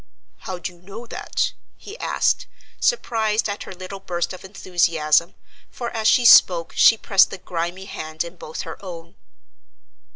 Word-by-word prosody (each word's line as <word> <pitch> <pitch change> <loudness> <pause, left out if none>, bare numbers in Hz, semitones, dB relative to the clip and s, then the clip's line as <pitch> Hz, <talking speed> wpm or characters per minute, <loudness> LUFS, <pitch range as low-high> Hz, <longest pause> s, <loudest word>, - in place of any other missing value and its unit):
"How 185 - -4
do 175 +1 -6
you 175 - -22
know 200 +6 -10
that?" - - -2 0.2
he 415 - -10
asked, - - 0 0.3
surprised 220 - +1
at 205 0 -5
her - - -8
little 185 +2 -8
burst 175 -1 -3
of 185 - -11
enthusiasm, 170 -4 +1 0.3
for 240 -1 -6
as 220 -1 -1
she 245 - +4
spoke 175 -7 +6
she 225 - +6
pressed 195 -2 +4
the - - -7
grimy 175 +1 -4
hand 160 -4 -5
in 170 +1 -10
both 160 -2 -7
her 165 +4 -9
own. 170 -2 -9
185 Hz, 160 wpm, -22 LUFS, 170-210 Hz, 0.3 s, spoke